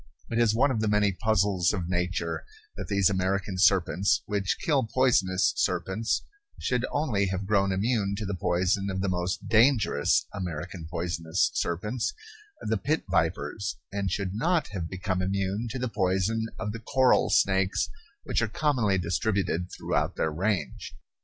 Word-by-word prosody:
It 115 - 0
is 115 -2 +3
one 135 +4 +3
of 115 - -1
the 110 - +1
many 105 -1 +3
puzzles 95 -3 +1
of 90 -5 -3
nature 90 -2 -2 0.3
that - - -6
these 100 -2 +3
American 95 0 -1
serpents 95 -1 +3
which 100 -2 -1
kill 145 -5 +1
poisonous 110 -6 +2
serpents 95 +5 0 0.4
should 125 0 0
only 120 -10 0
have 95 +1 -3
grown 100 -1 +2
immune 100 0 0
to 105 - -3
the 100 - -3
poison 95 +2 0
of 95 -1 -2
the 100 - 0
most 90 0 -2
dangerous 115 +1 +3
American 90 -2 -5
poisonous 85 0 -1
serpents, 105 +8 -2 0.5
the 110 +1 0
pit 150 +9 -1
vipers, 80 - -1
and 100 -1 -2
should 95 0 -2
not 165 - +1
have 90 -5 -4
become 95 0 -2
immune 100 +4 -1
to 130 - -4
the 125 0 -2
poison 100 +2 0
of 105 - -3
the 115 - -6
coral 130 +3 +3
snakes 95 0 +2 0.4
which - - 0
are - - +1
commonly 120 -10 +1
distributed 90 0 -1
throughout - - -1
their 80 - 0
range. 90 -3 -2
100 Hz, 155 wpm, -27 LUFS, 90-110 Hz, 0.5 s, is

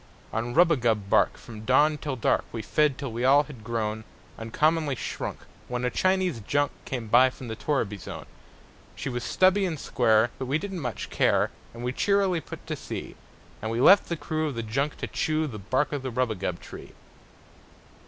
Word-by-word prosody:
On 120 +2 -2
rubagub 120 - +3
bark, - - +4
from 110 -2 -10
dawn 150 +6 +3
to 145 -3 -3
dark, 120 - +1
We 115 -2 -5
fed, 150 +4 +2
till 140 -4 -5
we 115 +2 -3
all 140 +3 +6
had 135 -7 -12
grown 110 -1 -2 0.4
Uncommonly 150 +6 +1
shrunk, - - -5 0.3
when 125 0 -2
a 125 - 0
Chinese 185 -7 +1
junk 145 +7 0
Came 125 -3 -4
by 125 +4 +6
from 130 -1 -10
the 110 - -4
torriby 110 -3 -1
zone. - - -8 0.7
She - - -4
was 120 -1 -3
stubby 190 +2 +3
and 170 -6 -2
square, 115 -2 +3
but 130 - -3
we 140 +4 +2
didn't 195 +1 -5
much 125 - -5
care, - - +2 0.2
And 120 +1 -9
we 125 +1 -1
cheerily 195 0 +2
put - - -10
to - - -3
sea; - - -7 0.5
And 110 - -3
we 115 +1 -1
left 195 +10 +6
the 170 - -1
crew 155 0 -2
of 145 - -4
the 115 - -3
junk 135 +7 -1
to - - -3
chew 155 -1 0
The 115 -8 -6
bark 130 +9 0
of 145 - -2
the 130 - -3
rubagub 110 -8 -1
tree. - - -11
130 Hz, 190 wpm, -27 LUFS, 115-155 Hz, 0.7 s, all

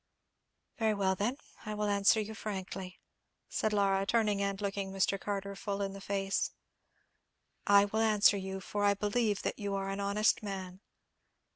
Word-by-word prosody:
"Very 220 -2 +2
well 190 -1 +2
then, 215 +8 -1 0.3
I 215 -1 -4
will 210 0 -1
answer 200 +2 +4
you 215 +1 -3
frankly," 190 -3 -6 0.5
said 215 - 0
Laura, 195 -2 +2
turning 210 -1 +1
and 200 -1 -1
looking 200 -1 -3
Mr. 195 +1 +1
Carter 200 -1 -3
full 200 0 -3
in 195 -1 -2
the 195 - -9
face. 195 0 -1 1.2
"I 200 0 +7
will 215 +2 -2
answer 210 -2 +5
you, 190 0 -5
for 205 +1 -3
I 200 0 +4
believe 210 0 0
that - - -2
you 200 -1 -2
are 195 0 -2
an 195 +1 -3
honest 200 +2 +2
man. 190 -3 -6
200 Hz, 165 wpm, -32 LUFS, 195-210 Hz, 1.2 s, I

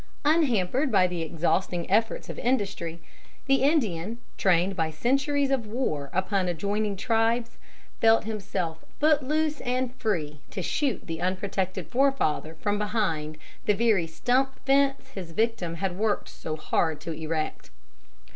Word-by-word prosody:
Unhampered 270 - +2
by 190 -4 +5
the 175 -2 -2
exhausting 170 +2 0
efforts 225 +3 +1
of - - -6
industry, 200 -9 -1 0.5
the 270 -1 +3
Indian, 230 - +1 0.2
trained 190 +1 +2
by 160 -3 0
centuries 275 - +1
of 250 -5 0
war 185 - -2
upon 190 0 0
adjoining 200 +4 -1
tribes, 230 +2 0 0.4
felt 225 0 +5
himself 200 -7 -3 0.2
foot 300 0 +4
loose 305 +2 0
and 250 0 -1
free 160 - -2
to 190 - -4
shoot 275 - -1
the 165 -1 -5
unprotected 185 0 -2
forefather 255 - +1
from 205 +5 -1
behind 190 -8 -1 0.3
the 210 - +4
very 215 -6 +3
stump 255 +10 +1
fence 275 0 +2
his 185 -9 -8
victim 220 -5 0
had 185 +1 -2
worked 210 +1 0
so 155 - -5
hard 155 0 0
to 165 +2 -6
erect. 160 0 -3
205 Hz, 135 wpm, -27 LUFS, 170-255 Hz, 0.5 s, by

